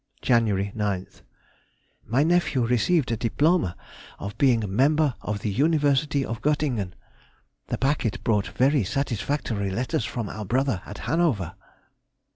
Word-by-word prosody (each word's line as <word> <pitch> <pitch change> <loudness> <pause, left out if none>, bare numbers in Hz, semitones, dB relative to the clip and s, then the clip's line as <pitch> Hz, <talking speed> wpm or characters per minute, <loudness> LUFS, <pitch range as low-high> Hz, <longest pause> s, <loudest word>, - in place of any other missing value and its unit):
Jan. 115 -3 +3
9th.—My 100 +4 -4
nephew 160 -7 +2
received 125 +5 +2
a - - +1
diploma 125 - +1 0.4
of 100 +1 -6
being 125 -5 +4
Member 140 +7 +2
of 105 -1 -3
the 105 - -1
University 145 +1 +2
of 115 +1 -5
Göttingen. 135 -11 0 0.7
The - - -2
packet 135 -5 0
brought 105 -3 +1
very 135 0 +2
satisfactory 115 -2 -2
letters 115 +4 -1
from 115 -1 -3
our 105 +2 -6
brother 125 -1 0
at 105 - -8
Hanover. 130 - +1
120 Hz, 120 wpm, -25 LUFS, 105-145 Hz, 0.7 s, being